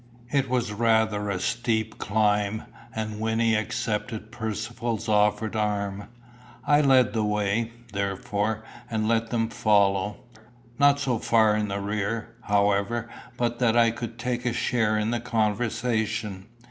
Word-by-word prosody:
It 135 Hz, -2 st, +1 dB
was 120 Hz, -4 st, 0 dB
rather 110 Hz, -2 st, +2 dB
a 95 Hz, -2 st, -1 dB
steep 110 Hz, +1 st, -1 dB
climb, 105 Hz, 0 st, +1 dB, 0.3 s
and 110 Hz, -1 st, -3 dB
Wynnie 115 Hz, 0 st, +2 dB
accepted 110 Hz, 0 st, -2 dB
Percivale's 110 Hz, 0 st, -3 dB
offered 105 Hz, +1 st, +2 dB
arm. 100 Hz, -2 st, -1 dB, 0.6 s
I 145 Hz, 0 st, +5 dB
led 130 Hz, -3 st, +4 dB
the 110 Hz, -2 st, +1 dB
way, 105 Hz, +2 st, 0 dB, 0.2 s
therefore, 100 Hz, +2 st, -2 dB, 0.3 s
and 110 Hz, -1 st, -1 dB
left 115 Hz, 0 st, +1 dB
them 115 Hz, -2 st, 0 dB
to -, -, -12 dB
follow 100 Hz, -1 st, +2 dB, 0.6 s
not 145 Hz, 0 st, +5 dB
so 125 Hz, -5 st, 0 dB
far 110 Hz, -2 st, +3 dB
in 105 Hz, 0 st, 0 dB
the 100 Hz, 0 st, -3 dB
rear, 105 Hz, +3 st, -3 dB
however, 105 Hz, +3 st, +1 dB, 0.3 s
but 120 Hz, -1 st, -1 dB
that 120 Hz, -2 st, +3 dB
I 115 Hz, -1 st, +5 dB
could 115 Hz, 0 st, -6 dB
take 125 Hz, 0 st, -2 dB
a 120 Hz, -, 0 dB
share 110 Hz, -3 st, +1 dB
in 105 Hz, +1 st, 0 dB
the 120 Hz, -, 0 dB
conversation. 110 Hz, -3 st, -1 dB
110 Hz, 140 wpm, -26 LUFS, 105-115 Hz, 0.6 s, I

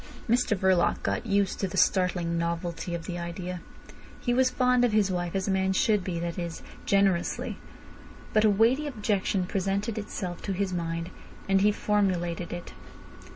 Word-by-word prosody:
Mr 240 Hz, -2 st, +2 dB
Verloc 185 Hz, -2 st, +2 dB
got 235 Hz, -, -1 dB
used 200 Hz, -2 st, +1 dB
to 195 Hz, -, 0 dB
the 180 Hz, -, -6 dB
startling 180 Hz, -3 st, +2 dB
novelty 170 Hz, +1 st, -2 dB
of 165 Hz, -, -6 dB
the 175 Hz, -1 st, -4 dB
idea. 175 Hz, +1 st, -5 dB, 0.6 s
He 245 Hz, -, 0 dB
was 255 Hz, +1 st, +4 dB
fond 250 Hz, -1 st, +3 dB
of 240 Hz, -3 st, +2 dB
his 205 Hz, -3 st, +3 dB
wife 175 Hz, 0 st, -2 dB
as 190 Hz, 0 st, -1 dB
a -, -, +1 dB
man 190 Hz, 0 st, +1 dB
should 210 Hz, 0 st, +2 dB
be—that 170 Hz, -1 st, -3 dB
is, 170 Hz, -1 st, -5 dB, 0.2 s
generously. 195 Hz, -3 st, +1 dB, 0.7 s
But 215 Hz, -, +4 dB
a 215 Hz, -, +6 dB
weighty 230 Hz, +9 st, +3 dB
objection 205 Hz, -6 st, 0 dB
presented 200 Hz, +4 st, -1 dB
itself 185 Hz, -4 st, -5 dB
to 195 Hz, -, -2 dB
his 190 Hz, 0 st, -1 dB
mind, 170 Hz, 0 st, -3 dB, 0.4 s
and 195 Hz, 0 st, +3 dB
he 210 Hz, +1 st, +5 dB
formulated 180 Hz, -5 st, 0 dB
it. 175 Hz, 0 st, -7 dB
190 Hz, 165 wpm, -28 LUFS, 175-210 Hz, 0.7 s, a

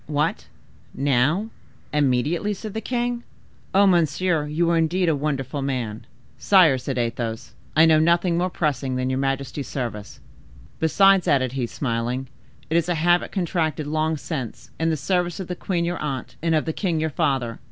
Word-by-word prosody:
"What, 150 Hz, +1 st, -1 dB, 0.5 s
now—immediately!" 150 Hz, -, 0 dB
said 210 Hz, +1 st, -7 dB
the 220 Hz, -, -3 dB
king. 240 Hz, 0 st, -2 dB, 0.5 s
"Ah, 200 Hz, +1 st, +5 dB
monsieur, 170 Hz, -2 st, +2 dB
you 160 Hz, +3 st, 0 dB
are 170 Hz, -, +3 dB
indeed 170 Hz, +3 st, +1 dB
a 160 Hz, -, +2 dB
wonderful 140 Hz, -1 st, -2 dB
man!" 125 Hz, -6 st, -3 dB, 0.3 s
"Sire," 170 Hz, -10 st, +5 dB
said 130 Hz, +1 st, -4 dB
Athos, 115 Hz, -1 st, -3 dB, 0.2 s
"I 160 Hz, +1 st, +7 dB
know 160 Hz, -1 st, +5 dB
nothing 170 Hz, +2 st, +3 dB
more 180 Hz, +2 st, +1 dB
pressing 140 Hz, -6 st, -1 dB
than 130 Hz, 0 st, -1 dB
your 130 Hz, -, -1 dB
majesty's 135 Hz, +1 st, -2 dB
service. 110 Hz, -6 st, -5 dB, 0.6 s
Besides," 195 Hz, +3 st, +4 dB
added 130 Hz, -3 st, +2 dB
he, 130 Hz, -2 st, -2 dB
smiling, 120 Hz, +1 st, -2 dB, 0.4 s
"it 160 Hz, -, +1 dB
is 170 Hz, +1 st, 0 dB
a 175 Hz, -, +1 dB
habit 175 Hz, +2 st, +2 dB
contracted 165 Hz, -5 st, -1 dB
long 155 Hz, +1 st, 0 dB
since, 135 Hz, -7 st, -6 dB
in 165 Hz, 0 st, +1 dB
the 160 Hz, -, 0 dB
service 175 Hz, +3 st, -1 dB
of 190 Hz, -, -5 dB
the 180 Hz, -, -4 dB
queen 175 Hz, -1 st, -1 dB
your 175 Hz, +1 st, -2 dB
aunt, 140 Hz, -4 st, -4 dB
and 165 Hz, 0 st, +2 dB
of 155 Hz, -, +1 dB
the 160 Hz, -, -2 dB
king 175 Hz, -4 st, -1 dB
your 160 Hz, 0 st, -1 dB
father. 130 Hz, -5 st, -1 dB
155 Hz, 170 wpm, -23 LUFS, 135-175 Hz, 0.6 s, I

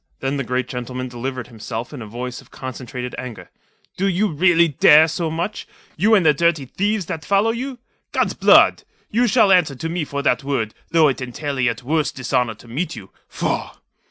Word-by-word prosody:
Then 135 Hz, +1 st, -2 dB
the 135 Hz, -, -1 dB
great 125 Hz, +1 st, -2 dB
gentleman 125 Hz, +1 st, -5 dB
delivered 125 Hz, +1 st, -5 dB
himself 115 Hz, +1 st, -7 dB
in 135 Hz, -, -7 dB
a 110 Hz, -, -7 dB
voice 125 Hz, +3 st, -6 dB
of -, -, -21 dB
concentrated 125 Hz, -1 st, -7 dB
anger. 125 Hz, -3 st, -8 dB, 0.5 s
"Do 195 Hz, -, +1 dB
you 195 Hz, +3 st, +1 dB
really 170 Hz, +1 st, +4 dB
dare 150 Hz, +1 st, +6 dB
so 165 Hz, +1 st, -2 dB
much, 170 Hz, +6 st, -4 dB, 0.3 s
you 215 Hz, +7 st, +4 dB
and 190 Hz, -5 st, +3 dB
the 150 Hz, -, +6 dB
dirty 165 Hz, -2 st, +1 dB
thieves 205 Hz, -, -1 dB
that 160 Hz, -1 st, -5 dB
follow 200 Hz, +6 st, +2 dB
you? 255 Hz, +3 st, -5 dB, 0.3 s
God's -, -, 0 dB
Blood! -, -, +5 dB, 0.3 s
You 240 Hz, +3 st, +2 dB
shall 220 Hz, -3 st, +4 dB
answer 175 Hz, -7 st, +4 dB
to 165 Hz, +6 st, -4 dB
me 170 Hz, -1 st, -2 dB
for 140 Hz, 0 st, -4 dB
that 125 Hz, +2 st, +1 dB
word, 125 Hz, -6 st, -2 dB, 0.2 s
though 160 Hz, -2 st, +5 dB
it 135 Hz, -2 st, -1 dB
entail 135 Hz, +2 st, -4 dB
a -, -, +2 dB
yet 120 Hz, -1 st, 0 dB
worse 150 Hz, +1 st, 0 dB
dishonour 125 Hz, -2 st, -1 dB
to 120 Hz, -, -17 dB
meet 145 Hz, +10 st, -3 dB
you. 100 Hz, -5 st, -11 dB, 0.2 s
Faugh!" -, -, -3 dB
140 Hz, 200 wpm, -21 LUFS, 125-170 Hz, 0.5 s, dare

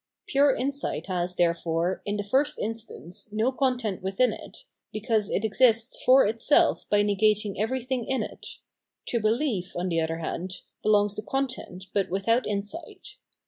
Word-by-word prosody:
Pure 275 Hz, 0 st, +3 dB
insight 280 Hz, +2 st, -2 dB
has, 180 Hz, -2 st, -2 dB
therefore, 170 Hz, +1 st, 0 dB
m 205 Hz, +1 st, -1 dB
the 205 Hz, -, -2 dB
first 265 Hz, +8 st, +1 dB
instance, 220 Hz, -4 st, -6 dB
no 220 Hz, +4 st, +1 dB
content 250 Hz, -7 st, -1 dB
within 195 Hz, +7 st, +1 dB
it, -, -, -11 dB, 0.3 s
because 215 Hz, -1 st, 0 dB
it 205 Hz, -, 0 dB
exists 230 Hz, +1 st, +3 dB
for 260 Hz, +1 st, +6 dB
itself 225 Hz, +7 st, +2 dB
by 205 Hz, 0 st, +4 dB
negating 210 Hz, 0 st, +2 dB
everything 250 Hz, +2 st, -1 dB
in 265 Hz, -, 0 dB
it; -, -, -9 dB, 0.6 s
to 235 Hz, -, 0 dB
behef, 215 Hz, -4 st, 0 dB
on 180 Hz, +1 st, -1 dB
the 165 Hz, -1 st, +1 dB
other 160 Hz, 0 st, -2 dB
hand, 180 Hz, +3 st, -4 dB, 0.2 s
belongs 205 Hz, -1 st, +3 dB
the -, -, -2 dB
content, 255 Hz, -7 st, -4 dB
but 200 Hz, -2 st, +1 dB
without 230 Hz, +7 st, +1 dB
insight. 205 Hz, +10 st, -6 dB
215 Hz, 150 wpm, -26 LUFS, 190-250 Hz, 0.6 s, for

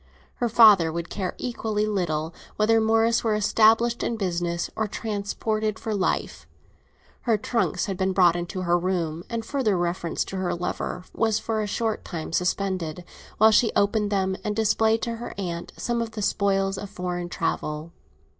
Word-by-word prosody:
Her 240 Hz, -, 0 dB
father 210 Hz, -8 st, +7 dB
would 170 Hz, +1 st, -5 dB
care 185 Hz, -3 st, -3 dB
equally 220 Hz, -3 st, -2 dB
little 165 Hz, -6 st, -1 dB, 0.2 s
whether 225 Hz, +1 st, +3 dB
Morris 225 Hz, +1 st, +3 dB
were 220 Hz, -2 st, +1 dB
established 225 Hz, +3 st, +3 dB
in 235 Hz, -, -1 dB
business 175 Hz, -3 st, -1 dB
or 220 Hz, -, -1 dB
transported 215 Hz, +1 st, -2 dB
for 220 Hz, -2 st, -4 dB
life. 195 Hz, -3 st, -1 dB, 0.8 s
Her 225 Hz, -2 st, +4 dB
trunks 230 Hz, +3 st, 0 dB
had 195 Hz, -4 st, -4 dB
been 190 Hz, +1 st, +1 dB
brought 180 Hz, -2 st, +4 dB
into 175 Hz, +2 st, -4 dB
her 175 Hz, -1 st, +2 dB
room, 170 Hz, -3 st, -2 dB
and 230 Hz, -1 st, -3 dB
further 230 Hz, -9 st, 0 dB
reference 175 Hz, -1 st, -1 dB
to 195 Hz, -, -6 dB
her 185 Hz, -2 st, -1 dB
lover 180 Hz, +1 st, -4 dB
was 225 Hz, -2 st, +1 dB
for 220 Hz, 0 st, -2 dB
a 210 Hz, -, -2 dB
short 220 Hz, +1 st, -2 dB
time 165 Hz, -2 st, -6 dB
suspended, 180 Hz, -2 st, -1 dB, 0.3 s
while 220 Hz, +1 st, +6 dB
she 225 Hz, +1 st, +4 dB
opened 205 Hz, +1 st, +2 dB
them 190 Hz, -1 st, +1 dB
and 210 Hz, -2 st, -2 dB
displayed 220 Hz, +1 st, +2 dB
to 230 Hz, -1 st, -2 dB
her 240 Hz, -, -7 dB
aunt 170 Hz, -3 st, -4 dB
some 235 Hz, -1 st, -1 dB
of 225 Hz, -1 st, -4 dB
the 215 Hz, -2 st, -4 dB
spoils 195 Hz, -1 st, +1 dB
of 205 Hz, -, -7 dB
foreign 180 Hz, -2 st, -4 dB
travel. 155 Hz, -1 st, -3 dB
200 Hz, 170 wpm, -25 LUFS, 175-220 Hz, 0.8 s, father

